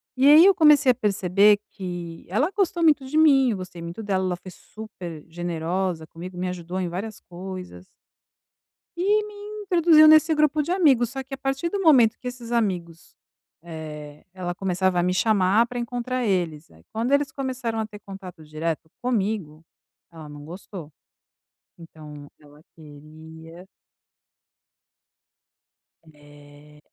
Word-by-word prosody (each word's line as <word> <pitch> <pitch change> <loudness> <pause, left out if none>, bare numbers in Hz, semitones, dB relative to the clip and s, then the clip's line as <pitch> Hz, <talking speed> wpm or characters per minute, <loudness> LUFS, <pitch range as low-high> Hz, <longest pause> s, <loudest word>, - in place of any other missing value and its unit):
E 265 +1 +3
aí 305 +4 +9
eu 395 - +7
comecei 300 -5 +6
a - - -2
perceber 200 0 +3
que 175 -3 -7
ela 225 - +1
gostou 365 -3 0
muito 300 -4 +3
de 285 +4 -3
mim, 275 -5 +5
eu 210 - -3
gostei 185 -2 -9
muito 170 +6 -7
dela, 190 -2 -1
ela 180 -1 -1
foi 185 +1 -12
super 180 -8 -10
generosa 175 0 -3
comigo, 175 +3 -10
me 180 0 -2
ajudou 180 +1 -5
em 180 -2 -2
várias 200 +5 -6
coisas. 180 - -9 1.1
E 410 +4 +2
me 420 - -11 0.3
introduziu 335 -4 +5
nesse 310 +1 +6
grupo 305 0 +2
de 310 +4 -4
amigos, 280 - +3
só 270 0 -5
que 265 +1 -12
a - - -4
partir 270 +4 -2
do 400 - -3
momento 250 - +5
que 250 - -7
esses 245 -1 -8
amigos, 180 -8 -3 0.5
eh, 150 -3 -9
ela 180 -2 -4
começava 185 -1 0
a - - +2
me 180 +1 +1
chamar 210 +2 +2
pra 245 0 -5
encontrar 245 +1 -3
eles, 170 -6 -2
aí 80 0 -20
quando 230 +4 -2
eles 280 -1 +2
começaram 255 -4 -4
a 220 - -1
ter 210 -1 -12
contato 190 -4 -11
direto 155 +1 -4
comigo, 200 -10 -2 0.5
ela 160 -2 -11
não 145 0 -11
gostou. 175 -1 -10 0.9
Então 150 -3 -12
ela 145 0 -19
queria 160 +3 -14 2.5
É. 145 0 -18
190 Hz, 150 wpm, -24 LUFS, 165-255 Hz, 2.5 s, aí